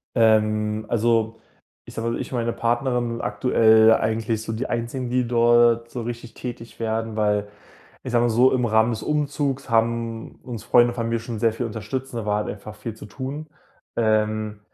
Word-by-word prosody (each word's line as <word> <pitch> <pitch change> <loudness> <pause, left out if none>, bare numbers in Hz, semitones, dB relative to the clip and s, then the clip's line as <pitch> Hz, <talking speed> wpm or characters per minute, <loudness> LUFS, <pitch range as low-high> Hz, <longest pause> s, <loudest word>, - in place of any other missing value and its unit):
Ähm, 110 -1 +2
also, 115 -1 +1 0.4
ich - - -12
sage 115 +1 -2
mal, 115 - -3
ich - - -6
und 125 - -1
meine 115 0 0
Partnerin 120 0 -1
aktuell 110 +1 +4
eigentlich 110 0 -1
so 110 - -5
die 115 +3 -3
einzigen, 120 +2 -3
die 125 0 +1
dort 120 0 +4
so 125 - -5
richtig 120 0 -7
tätig 120 -2 -8
werden, 110 0 -2
weil 105 -1 +1 0.5
ich 130 - -6
sage 120 -1 +3
mal - - +3
so, 125 +4 +4
im 125 -1 +1
Rahmen 110 0 +3
des 110 -2 -4
Umzugs 145 -3 -1
haben 115 0 0
uns 120 -4 -7
Freunde 120 0 +4
von 115 -1 -2
mir 115 0 0
schon 115 0 -6
sehr 115 +1 +2
viel 120 +2 -3
unterstützt 115 +4 -5
und 115 - -2
da 110 - -7
war 105 0 0
halt - - -6
einfach 105 +1 -10
viel 105 +1 -6
zu 110 - -11
tun. 135 +8 -6 0.5
Ähm, 110 -1 0
115 Hz, 190 wpm, -23 LUFS, 110-120 Hz, 0.5 s, aktuell